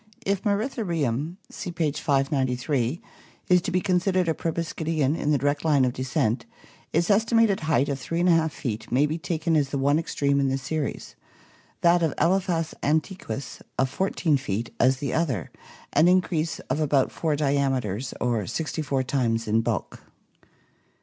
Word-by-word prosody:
If 195 Hz, -1 st, 0 dB
Moeritherium 175 Hz, -, -1 dB, 0.2 s
(see 180 Hz, -, -6 dB
page 155 Hz, -4 st, -1 dB
593) 135 Hz, -1 st, 0 dB, 0.5 s
is 180 Hz, -1 st, +5 dB
to -, -, -3 dB
be 185 Hz, -, +1 dB
considered 185 Hz, -1 st, +1 dB
a 160 Hz, -, +2 dB
proboscidean 160 Hz, -3 st, -1 dB
in 150 Hz, -, -2 dB
the 150 Hz, -, +4 dB
direct 145 Hz, +2 st, 0 dB
line 145 Hz, -5 st, +4 dB
of 125 Hz, -, 0 dB
descent, 130 Hz, -, -1 dB, 0.4 s
its 170 Hz, +5 st, +2 dB
estimated 225 Hz, -1 st, +3 dB
height 155 Hz, -3 st, +1 dB
of 140 Hz, -1 st, -2 dB
3^ 165 Hz, +3 st, +2 dB
feet 110 Hz, -6 st, -5 dB
may 135 Hz, +4 st, +4 dB
be 155 Hz, +3 st, -2 dB
taken 165 Hz, 0 st, -1 dB
as 145 Hz, -3 st, +2 dB
the 140 Hz, -, -2 dB
one 140 Hz, +3 st, +3 dB
extreme 140 Hz, -3 st, 0 dB
in 140 Hz, -, +2 dB
the 135 Hz, -, 0 dB
series, 150 Hz, +2 st, -4 dB, 0.7 s
that 175 Hz, 0 st, +4 dB
of 160 Hz, -4 st, 0 dB
Ekphas 175 Hz, -3 st, +1 dB
antiquus 155 Hz, -2 st, -2 dB, 0.2 s
of 130 Hz, 0 st, +1 dB
14 165 Hz, -3 st, +1 dB
feet 115 Hz, -3 st, -4 dB
as 130 Hz, +2 st, +4 dB
the 140 Hz, -1 st, -3 dB
other, 135 Hz, -, -1 dB, 0.4 s
an 155 Hz, +4 st, +5 dB
increase 170 Hz, -4 st, +2 dB
of -, -, -3 dB
about 140 Hz, -3 st, +2 dB
four 160 Hz, -3 st, -1 dB
diameters 135 Hz, -6 st, 0 dB
or 115 Hz, -6 st, 0 dB
sixty 160 Hz, 0 st, -3 dB
four 135 Hz, -3 st, 0 dB
times 115 Hz, -4 st, 0 dB
in 110 Hz, +2 st, +3 dB
bulk. -, -, -3 dB
150 Hz, 155 wpm, -25 LUFS, 135-170 Hz, 0.7 s, is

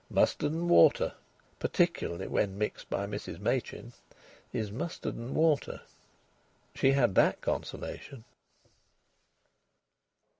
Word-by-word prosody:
Mustard 145 Hz, -, +2 dB
and 165 Hz, +2 st, -2 dB
water, 130 Hz, -, +5 dB, 0.5 s
particularly 85 Hz, -, 0 dB
when 95 Hz, -1 st, 0 dB
mixed 105 Hz, 0 st, -3 dB
by -, -, -1 dB
Mrs -, -, -6 dB
Machin, -, -, -2 dB, 0.6 s
is 110 Hz, -4 st, -3 dB
mustard 160 Hz, +10 st, -4 dB
and 120 Hz, +3 st, -6 dB
water. 155 Hz, -3 st, +2 dB, 0.9 s
She 135 Hz, -, +3 dB
had 120 Hz, -7 st, +3 dB
that -, -, +4 dB
consolation. 130 Hz, -5 st, -5 dB
130 Hz, 100 wpm, -30 LUFS, 105-155 Hz, 0.9 s, water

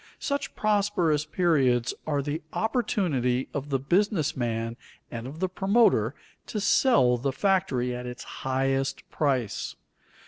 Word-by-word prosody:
Such 280 Hz, 0 st, -3 dB
prosperous 200 Hz, -8 st, +1 dB
periods 135 Hz, -9 st, +2 dB
are 145 Hz, -2 st, 0 dB
the 150 Hz, +3 st, -3 dB
opportunity 165 Hz, -, 0 dB
of 145 Hz, 0 st, -4 dB
the 135 Hz, -, +2 dB
business 175 Hz, -, +1 dB
man 115 Hz, -2 st, -2 dB, 0.4 s
and 115 Hz, +1 st, -5 dB
of 150 Hz, +4 st, -9 dB
the 185 Hz, -, +1 dB
promoter 190 Hz, -, +2 dB, 0.3 s
to 215 Hz, -, -3 dB
sell 135 Hz, -, +4 dB
the 135 Hz, +3 st, -1 dB
factory 135 Hz, -7 st, +1 dB
at 125 Hz, 0 st, -6 dB
its 125 Hz, 0 st, -7 dB
highest 135 Hz, 0 st, -2 dB
price. 130 Hz, -8 st, -1 dB
140 Hz, 130 wpm, -27 LUFS, 125-190 Hz, 0.4 s, sell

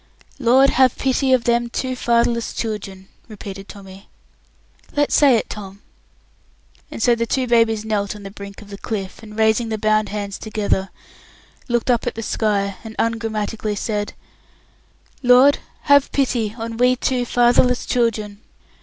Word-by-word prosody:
"Lord, 265 Hz, +2 st, +5 dB
have 255 Hz, -1 st, +3 dB
pity 265 Hz, 0 st, +1 dB
on 255 Hz, -2 st, +4 dB
them 235 Hz, 0 st, +1 dB
two 255 Hz, +2 st, -3 dB
fatherless 235 Hz, -1 st, +1 dB
children!" 195 Hz, -4 st, -5 dB, 0.2 s
repeated 200 Hz, -3 st, -9 dB
Tommy. 195 Hz, -1 st, -12 dB, 0.9 s
"Let's 290 Hz, 0 st, +1 dB
say 280 Hz, -4 st, +5 dB
it 225 Hz, -, -1 dB
together." 195 Hz, -2 st, -8 dB, 1.1 s
And -, -, -5 dB
so 240 Hz, -, +5 dB
the 230 Hz, 0 st, -1 dB
two 260 Hz, +3 st, 0 dB
babies 230 Hz, -2 st, +2 dB
knelt 205 Hz, -2 st, -1 dB
on 205 Hz, -, -11 dB
the 195 Hz, -, -8 dB
brink 200 Hz, +1 st, -10 dB
of 205 Hz, -, -16 dB
the 200 Hz, -, -8 dB
cliff, 195 Hz, -3 st, -5 dB
and, 215 Hz, -1 st, -12 dB
raising 220 Hz, +1 st, +2 dB
the 220 Hz, -, -2 dB
bound 215 Hz, -1 st, +1 dB
hands 205 Hz, -1 st, -5 dB
together, 205 Hz, -3 st, -1 dB, 0.8 s
looked 240 Hz, 0 st, +1 dB
up 240 Hz, 0 st, 0 dB
at -, -, -2 dB
the 225 Hz, -, -5 dB
sky, 200 Hz, -3 st, -1 dB
and 220 Hz, -1 st, -9 dB
ungrammatically 220 Hz, -2 st, -2 dB
said, 205 Hz, 0 st, -3 dB, 1.1 s
"Lord 255 Hz, +2 st, +6 dB, 0.2 s
have 285 Hz, -1 st, +4 dB
pity 235 Hz, -6 st, 0 dB
on 225 Hz, 0 st, -5 dB
we 250 Hz, +1 st, +4 dB
two 250 Hz, 0 st, -1 dB
fatherless 245 Hz, +1 st, +3 dB
children!" 215 Hz, -4 st, -1 dB
225 Hz, 155 wpm, -20 LUFS, 210-245 Hz, 1.1 s, Lord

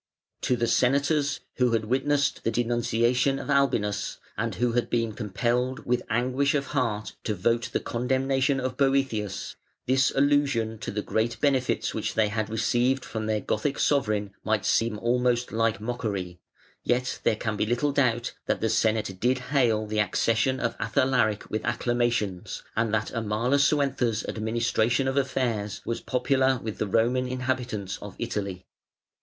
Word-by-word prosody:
To 125 Hz, -, +1 dB
the 120 Hz, -1 st, 0 dB
Senators, 140 Hz, +5 st, +2 dB, 0.2 s
who 125 Hz, -2 st, +2 dB
had 110 Hz, -1 st, +1 dB
witnessed 140 Hz, +4 st, +1 dB
the -, -, +1 dB
denunciation 120 Hz, +3 st, +1 dB
of 145 Hz, -, -4 dB
Albinus, 115 Hz, -7 st, +1 dB, 0.2 s
and 115 Hz, -2 st, -2 dB
who 120 Hz, +4 st, +1 dB
had 120 Hz, +1 st, 0 dB
been 115 Hz, -2 st, 0 dB
compelled 120 Hz, +5 st, -1 dB
with 125 Hz, 0 st, +1 dB
anguish 130 Hz, +5 st, +1 dB
of 140 Hz, -1 st, 0 dB
heart 115 Hz, -6 st, -1 dB
to 105 Hz, -, -1 dB
vote 115 Hz, +5 st, 0 dB
the -, -, 0 dB
condemnation 135 Hz, +3 st, 0 dB
of 130 Hz, 0 st, -3 dB
Boëthius, 135 Hz, -8 st, 0 dB, 0.3 s
this 130 Hz, +1 st, +3 dB
allusion 135 Hz, -6 st, +2 dB
to -, -, -5 dB
the 105 Hz, 0 st, -3 dB
great 115 Hz, +1 st, -1 dB
benefits 135 Hz, -3 st, +1 dB
which -, -, -3 dB
they 110 Hz, -1 st, +3 dB
had 110 Hz, 0 st, -2 dB
received 120 Hz, +4 st, +1 dB
from 110 Hz, -1 st, -4 dB
their 110 Hz, -1 st, 0 dB
Gothic 110 Hz, +9 st, -1 dB
sovereign 105 Hz, -8 st, +1 dB
might 110 Hz, -1 st, 0 dB
seem 115 Hz, -2 st, +2 dB
almost 120 Hz, +1 st, +1 dB
like 115 Hz, -2 st, +1 dB
mockery: 105 Hz, -6 st, -4 dB, 0.4 s
yet 125 Hz, +1 st, 0 dB
there -, -, +2 dB
can 110 Hz, 0 st, -3 dB
be 105 Hz, -, 0 dB
little 120 Hz, +5 st, +1 dB
doubt 125 Hz, -4 st, +1 dB
that -, -, +1 dB
the 110 Hz, -, 0 dB
Senate 110 Hz, -3 st, +1 dB
did 125 Hz, +4 st, +2 dB, 0.2 s
hail 115 Hz, -6 st, +3 dB
the 105 Hz, 0 st, -2 dB
accession 115 Hz, +5 st, +1 dB
of 115 Hz, -, -1 dB
Athalaric 115 Hz, -1 st, +1 dB
with 110 Hz, -, -2 dB
acclamations, 120 Hz, -6 st, -1 dB
and 110 Hz, 0 st, +1 dB
that 110 Hz, -1 st, -1 dB
Amalasuentha's 125 Hz, +1 st, +1 dB
administration 115 Hz, +3 st, 0 dB
of 135 Hz, -, 0 dB
affairs 125 Hz, -7 st, -1 dB
was 115 Hz, -, -3 dB
popular 130 Hz, +1 st, +2 dB
with 110 Hz, -2 st, -6 dB
the 105 Hz, -, 0 dB
Roman 120 Hz, +5 st, +2 dB
inhabitants 125 Hz, -6 st, -2 dB
of 100 Hz, -1 st, -8 dB
Italy. 100 Hz, -6 st, -4 dB
120 Hz, 155 wpm, -26 LUFS, 110-130 Hz, 0.4 s, this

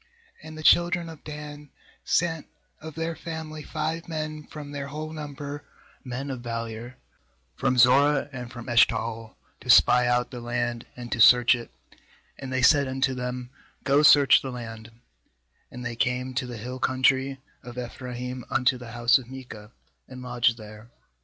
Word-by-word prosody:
2And 155 Hz, 0 st, -10 dB
the 155 Hz, -, -8 dB
children 175 Hz, +1 st, +4 dB
of 160 Hz, -2 st, -12 dB
Dan 150 Hz, -1 st, -9 dB, 0.3 s
sent 165 Hz, -2 st, 0 dB, 0.3 s
of 160 Hz, -1 st, -9 dB
their 165 Hz, 0 st, -3 dB
family 160 Hz, -1 st, -7 dB
five 160 Hz, +2 st, -4 dB
men 155 Hz, -1 st, -5 dB
from 145 Hz, -2 st, -9 dB
their 140 Hz, -1 st, -5 dB
whole 155 Hz, +2 st, -6 dB
number, 145 Hz, -1 st, -7 dB, 0.4 s
men 130 Hz, +2 st, -5 dB
of 130 Hz, -2 st, -6 dB
valour, 115 Hz, +1 st, -6 dB, 0.6 s
from 130 Hz, -, 0 dB
Zorah, 135 Hz, +3 st, +5 dB
and 125 Hz, -2 st, -7 dB
from 120 Hz, -2 st, -9 dB
Eshtapl, 115 Hz, -2 st, +1 dB, 0.2 s
to -, -, -12 dB
spy 125 Hz, 0 st, +6 dB
out 120 Hz, 0 st, +1 dB
the 125 Hz, -, -7 dB
land, 120 Hz, 0 st, -3 dB
and 120 Hz, -1 st, -8 dB
to 115 Hz, -, 0 dB
search 125 Hz, +2 st, +7 dB
it; 120 Hz, -1 st, -5 dB, 0.7 s
and 135 Hz, -1 st, -7 dB
they 130 Hz, -1 st, 0 dB
said 140 Hz, +1 st, +5 dB
unto 130 Hz, 0 st, 0 dB
them: 125 Hz, 0 st, -5 dB, 0.3 s
'Go, 140 Hz, +1 st, +3 dB
search 145 Hz, -2 st, +7 dB
the 135 Hz, -, -5 dB
land'; 115 Hz, -3 st, -8 dB, 0.8 s
and 125 Hz, 0 st, -9 dB
they 120 Hz, 0 st, -4 dB
came 125 Hz, +2 st, -1 dB
to 130 Hz, 0 st, -2 dB
the 120 Hz, -1 st, -7 dB
hill 125 Hz, +4 st, -6 dB
country 130 Hz, +1 st, +1 dB, 0.2 s
of 120 Hz, 0 st, -11 dB
Ephraim, 125 Hz, 0 st, -6 dB
unto 125 Hz, 0 st, +2 dB
the 120 Hz, -2 st, -10 dB
house 120 Hz, +1 st, +4 dB
of 125 Hz, -2 st, -13 dB
Micah, 120 Hz, -5 st, -10 dB, 0.4 s
and 130 Hz, -1 st, -10 dB
lodged 120 Hz, -2 st, +1 dB
there. 110 Hz, 0 st, -12 dB
130 Hz, 165 wpm, -26 LUFS, 120-145 Hz, 0.8 s, search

